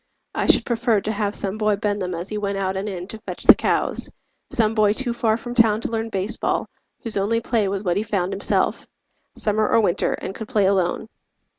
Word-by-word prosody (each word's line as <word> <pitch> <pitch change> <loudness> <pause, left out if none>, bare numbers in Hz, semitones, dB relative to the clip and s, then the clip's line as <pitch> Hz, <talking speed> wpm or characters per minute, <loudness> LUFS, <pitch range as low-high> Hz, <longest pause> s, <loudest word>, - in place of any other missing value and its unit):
I - - -1
should - - +5
prefer 235 -2 +1
to 215 - -2
have 205 -1 -1
some 200 +2 -1
boy 215 -1 +2
bend 205 0 -2
them 180 -1 -3
As 175 +3 -5
he 215 - -3
went 200 -1 -2
out 190 -1 -1
and 195 +2 -3
in 180 -2 -6
to 220 - -7
fetch - - -7
the - - +10
cows - - +2 0.4
Some 220 -2 +2
boy 210 -2 +3
too 245 +1 -1
far 225 -2 +1
from 240 +1 -7
town 225 -3 +4
to - - -4
learn 225 0 -2
baseball, 200 +1 -1 0.4
Whose 225 -4 -2
only 210 +4 +1
play 230 -3 0
was 195 +1 -3
what 175 -3 0
he - - +1
found 200 -4 -2
himself, 200 - 0 0.5
Summer 215 0 0
or - - +4
winter, 200 -6 +1
and 190 - -5
could 220 +1 -7
play 210 -5 +2
alone. 190 +1 +1
210 Hz, 225 wpm, -22 LUFS, 195-225 Hz, 0.5 s, the